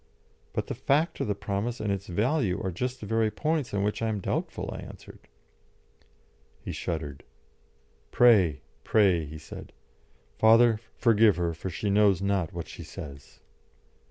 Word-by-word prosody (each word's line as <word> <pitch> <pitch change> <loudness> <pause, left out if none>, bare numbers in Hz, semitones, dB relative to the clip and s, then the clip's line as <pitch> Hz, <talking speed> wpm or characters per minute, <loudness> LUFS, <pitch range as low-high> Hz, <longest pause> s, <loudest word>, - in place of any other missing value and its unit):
"But - - -2
the - - -4
fact 150 +5 +1
of - - -1
the 105 - 0
promise 100 +4 -3
and 105 -2 -1
its 100 - -3
value 105 - 0
are 95 - -1
just 125 +8 -3
the - - -6
very 115 +1 +1
points 150 +5 -1
on 100 -1 0
which 105 +2 -1
I 115 - 0
am 105 -2 -2
doubtful," - - -3
I - - -7
answered. - - -11 1.4
He - - -6
shuddered. 75 -4 -4 0.9
"Pray, 100 - +4 0.2
pray," 95 -7 +3
he 75 +2 -8
said. 80 - -10 0.7
"Father, 115 0 +6 0.2
forgive 115 -3 +5
her, 85 -1 -1
for 85 +4 -6
she 100 +4 -2
knows 100 -3 +4
not 100 -4 0
what 85 -1 -6
she - - -9
says." 70 -2 -10
100 Hz, 155 wpm, -27 LUFS, 90-115 Hz, 1.4 s, Father